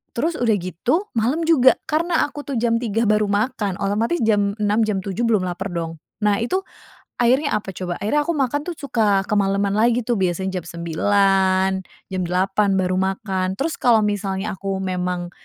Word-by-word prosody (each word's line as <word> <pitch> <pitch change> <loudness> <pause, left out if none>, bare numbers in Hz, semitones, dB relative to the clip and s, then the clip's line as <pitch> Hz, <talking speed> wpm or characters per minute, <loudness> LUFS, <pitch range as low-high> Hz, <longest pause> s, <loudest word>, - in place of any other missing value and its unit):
terus 315 +8 0
udah 230 -3 +2
gitu 235 - -1
malem 250 +9 +1
juga, 260 -6 +6
karena 330 +2 +1
aku 290 0 -8
tuh 280 - -4
jam 230 0 +2
3.00 225 -1 0
baru 210 0 +3
makan 205 -2 -1
otomatis 215 +11 0
jam 205 -2 +2
6.00, 210 +2 +2
jam 205 -3 -1
7.00 200 +4 -3
belum 210 -5 +2
laper 180 +2 -4
dong. 165 -1 -4 0.2
Nah 210 -1 +3
itu, 370 +11 0 0.6
akhirnya 260 +5 +2
apa 205 -2 -4
coba? 180 -1 -4
Akhirnya 255 +9 +1
aku 340 - 0
makan 280 +1 0
tuh 350 - -3
suka 220 -9 +1
kemaleman 200 -1 +1
lagi 230 +3 +2
tuh 235 -1 0
biasanya 185 +1 -1
jam 170 - -16
9.00, 190 +3 +2 0.4
jam 185 -1 -1
8.00 195 +3 +1
baru 185 -1 0
makan. 190 -1 -1
Terus 315 +4 -1
kalau 230 -3 +4
misalnya 205 0 -2
aku 195 0 -3
memang 180 -1 -2
205 Hz, 175 wpm, -21 LUFS, 190-240 Hz, 0.6 s, juga